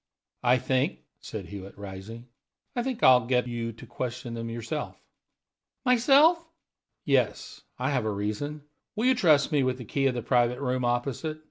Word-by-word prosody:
"I 125 0 +4
think," 130 0 0 0.2
said - - -7
Hewitt, 100 -1 -9
rising 100 +4 -8 0.5
"I 240 - +1
think 255 -1 -3
I'll 125 -2 +6
get 125 -1 +2
you 115 -1 -3
to 110 - -12
question 120 -1 -5
them 115 0 -4
yourself." 120 +7 -5 0.9
"Myself?" 280 +7 +5 0.6
"Yes, - - 0 0.2
I - - -1
have 125 -5 0
a 110 - 0
reason. 110 +9 -3 0.3
Will 220 +3 0
you 260 - +6
trust 160 - +4
me 145 -2 +3
with 130 -1 0
the 125 - -8
'key' 135 +5 +1
of 130 - 0
the 120 - -3
private 120 0 +2
room 130 -2 -1
opposite? 135 +6 -2
125 Hz, 165 wpm, -27 LUFS, 115-150 Hz, 0.9 s, I'll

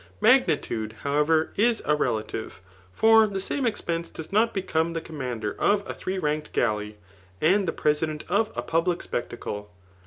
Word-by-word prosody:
Magnitude, 110 -1 +2
however, 150 +3 +2
is 230 +1 +2
a 150 - +3
relative; 110 -6 -2 0.3
for 220 - +5
the 200 -2 -4
saiade 250 +7 -1
eixpense 170 -4 -4
does 160 - -8
not 225 +2 +4
become 170 -4 -1
the 165 - -1
commander 125 -10 -4
of 205 -1 +2
a - - -4
three 190 +1 -4
ranked 150 -3 -2
galleys 105 0 0 0.4
and 190 +4 +3
the - - +1
president 150 0 0
of 210 +5 +1
a - - -2
public 170 +2 0
spec 120 - -3
tacle. 105 -3 -6
160 Hz, 160 wpm, -26 LUFS, 130-195 Hz, 0.4 s, for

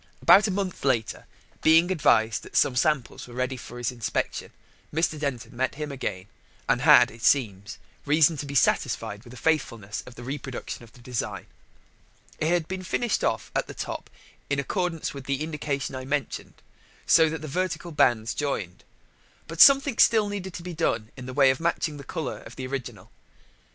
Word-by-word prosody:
About 210 +2 +6
a - - -2
month 190 -1 -3
later, 125 -5 0 0.3
being 165 +3 +5
advised 115 - +3
that - - -13
some 130 - +3
samples 135 -1 0
were 120 - -12
ready 130 +1 -1
for 120 -1 -10
his 120 -1 -2
inspection, 120 -3 -3 0.4
Mr. 160 0 0
Denton 140 -5 -4
met 130 +2 -1
him 150 0 -5
again, 100 -9 -4 0.4
and - - +2
had, - - +7
it 115 +1 -14
seems, 105 -6 +1 0.3
reason 155 +2 +4
to 145 - -5
be 140 - -6
satisfied 115 -5 +1
with 120 - -14
the 125 - -11
faithfulness 115 -9 -1
of 125 - -11
the 120 - -10
reproduction 135 -1 -6
of 115 - -15
the 125 - -17
design. 120 -2 -4 0.9
It 155 - 0
had 170 -1 +1
been 190 0 -4
finished 220 +5 -1
off - - -1
at - - 0
the - - -9
top - - -5 0.4
in 140 - +1
accordance 170 +3 -2
with 140 -2 -9
the 140 +1 -1
indication 150 -3 -3
I 130 0 -5
mentioned, 140 -1 -4 0.4
so 160 -1 +5
that 155 -1 -5
the - - -5
vertical 175 +2 -2
bands 115 -7 +2
joined. 105 -12 -3 0.6
But 165 +1 -1
something 275 -1 +7
still 220 -3 +5
needed 190 -3 -5
to 170 - -7
be 180 0 -6
done 115 -9 -1
in 125 -1 -9
the - - -5
way 135 -1 +5
of 130 - -3
matching 165 -2 -1
the 140 - -9
colour 140 -1 -4
of 120 - -12
the 130 - -5
original. 130 -1 -6
140 Hz, 185 wpm, -26 LUFS, 120-165 Hz, 0.9 s, had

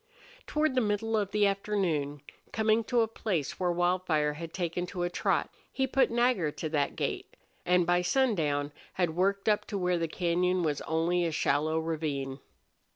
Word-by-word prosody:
Toward 305 -2 +1
the 255 - +2
middle 220 +1 0
of 205 -3 0
the 210 0 +2
afternoon, 180 -8 -1 0.3
coming 220 +1 +2
to 240 0 +2
a 225 - +2
place 190 -9 -3
where 180 -1 +1
Wildfire 175 -4 +1
had 165 +2 -7
taken 175 0 -2
to 175 -1 -4
a 175 - -1
trot, - - 0 0.2
he 265 - 0
put 265 +1 +2
Nagger 235 -8 +2
to 155 +2 -5
that 145 -2 0
gait, - - -3 0.3
and 180 0 +4
by 175 +1 +3
sundown 170 - +1 0.2
had 175 -4 0
worked 195 +3 +1
up 210 -1 +2
to 205 - -4
where 180 -2 +1
the 165 - 0
cañon 180 +2 0
was 150 -3 -1
only 165 +3 +1
a 165 - 0
shallow 155 +1 +1
ravine. 150 -4 -2
175 Hz, 175 wpm, -29 LUFS, 160-205 Hz, 0.3 s, and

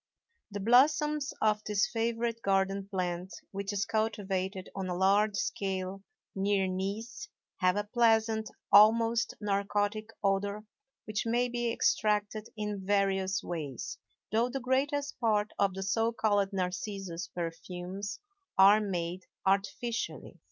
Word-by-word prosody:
The 205 -1 -5
blossoms 290 +6 +3
of 215 -1 +2
this 210 -1 +1
favorite 230 0 -1
garden 195 0 +1
plant, 180 -1 -3 0.2
which 200 +1 -3
is 200 -1 -1
cultivated 195 -4 -2
on 190 -1 -3
a 180 - -1
large 200 +2 +3
scale 190 -1 -2 0.3
near 195 0 +1
Nice, 200 - -4 0.3
have 185 0 +3
a 205 - 0
pleasant, 220 0 +2 0.2
almost 225 +2 +5
narcotic 205 +1 -1
odor 200 +1 0 0.4
which 215 +2 -2
may 240 +2 +2
be 240 -1 -1
extracted 210 -1 +1
in 210 -2 -3
various 195 -1 +1
ways; 150 -7 -5 0.3
though 230 +3 +2
the 270 +2 -3
greatest 280 +3 0
part 215 -2 +1
of 195 -2 +2
the 195 - -3
so 225 +4 +1
called 205 -3 +1
narcissus 185 -2 -3
perfumes 180 +4 -5 0.4
are 200 +3 +7
made 180 -2 -3 0.2
artificially. 205 +4 -1
205 Hz, 125 wpm, -30 LUFS, 190-225 Hz, 0.4 s, are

